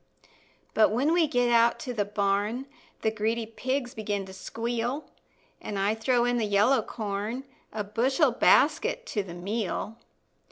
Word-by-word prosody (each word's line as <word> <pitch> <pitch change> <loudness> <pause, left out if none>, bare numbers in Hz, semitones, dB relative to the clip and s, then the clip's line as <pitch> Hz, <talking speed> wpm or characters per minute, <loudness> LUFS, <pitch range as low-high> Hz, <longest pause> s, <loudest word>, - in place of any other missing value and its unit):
But 220 - +5
when 265 +9 +1
we 340 -2 +4
get 245 -4 +1
out 235 0 +4
to 250 - -4
the 210 -3 0
barn 205 +4 0 0.4
The 220 - +2
greedy 225 +1 -1
pigs 255 +3 -3
begin 205 -4 -3
to 190 - -11
squeal, 235 +7 -3 0.6
An' 205 - -5
I 200 +2 +2
throw 240 +2 +1
in 245 0 +1
the 225 - +1
yellow 205 +6 +4
corn, 215 +3 -4 0.3
A 210 -1 -3
bushel 255 +7 +2
basket 370 - +3
to 215 - -2
the 180 -3 -9
meal. 210 +4 -3
230 Hz, 155 wpm, -27 LUFS, 205-250 Hz, 0.6 s, But